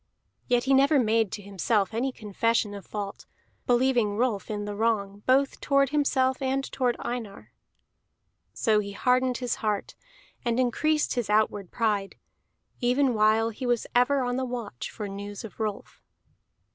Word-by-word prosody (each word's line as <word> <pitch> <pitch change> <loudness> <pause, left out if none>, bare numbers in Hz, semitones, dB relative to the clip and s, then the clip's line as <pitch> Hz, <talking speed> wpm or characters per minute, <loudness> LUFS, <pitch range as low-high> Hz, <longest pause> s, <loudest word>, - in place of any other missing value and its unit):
Yet 245 -1 +2
he 270 - +2
never 275 +3 +5
made 225 -4 +2
to 205 - -5
himself 200 +2 0
any 250 +4 0
confession 215 -1 0
of 200 -2 -9
fault, 205 -2 -6 0.4
believing 240 -4 +2
Rolf 225 -5 0
in 205 -1 -3
the 205 - -4
wrong, 205 -2 -1
both 270 +2 +2
toward 275 -1 +3
himself 265 -3 +1
and 270 +1 0
toward 250 -2 0
Einar. 230 -5 -6 1.0
So 215 -2 +2
he 200 -1 -4
hardened 250 +2 +2
his 245 -2 -2
heart 210 -2 -1 0.5
and 235 -1 0
increased 300 +5 +1
his 240 -5 -2
outward 210 -3 +1
pride, 210 -4 -1 0.6
even 250 +2 +2
while 220 +1 +3
he 245 +3 -5
was 240 -2 +1
ever 255 +3 +3
on 245 0 -1
the 260 - -1
watch 240 - -5
for 210 -2 -6
news 200 +1 -7
of 225 - -10
Rolf. 215 -2 -4
230 Hz, 155 wpm, -27 LUFS, 210-255 Hz, 1.0 s, never